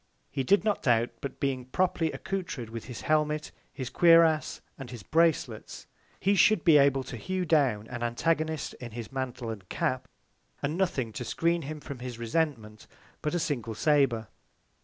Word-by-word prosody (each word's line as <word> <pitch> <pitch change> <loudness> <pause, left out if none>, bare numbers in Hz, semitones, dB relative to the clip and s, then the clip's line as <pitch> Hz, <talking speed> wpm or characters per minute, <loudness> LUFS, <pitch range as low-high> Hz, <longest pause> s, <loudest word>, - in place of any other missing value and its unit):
He 140 - -1
did 200 +11 +4
not 210 -2 0
doubt, 120 -2 +2
but 140 - -6
being 130 -3 -1
properly 165 +2 0
accoutred 165 - -4
with 115 -1 -6
his 125 -2 -7
Helmet, 150 0 0 0.2
his 130 -3 -6
Cuirass, 165 -2 +5 0.2
and 135 -3 -9
his 120 -5 -8
Bracelets, 155 - 0 0.3
he 195 +1 +2
should 200 -1 +4
be 155 -3 +7
able 135 -1 +3
to 130 - -7
hue 185 +8 -2
down 135 -10 +2
an 120 +1 -7
Antagonist, 155 +6 0
in 120 -3 -7
his 115 0 -7
Mantle 125 -3 -4
and 100 -4 -9
Cap, 130 0 -1 0.6
and 145 +3 -1
nothing 140 - -1
to 125 - -4
skreen 165 +6 0
him 155 +2 -5
from 140 -3 -8
his 125 -1 -6
Resentment, 115 -4 -2 0.3
but 150 +3 -1
a - - +1
single 130 -9 -2
Sabre. 135 -5 +2
140 Hz, 170 wpm, -28 LUFS, 120-160 Hz, 0.6 s, be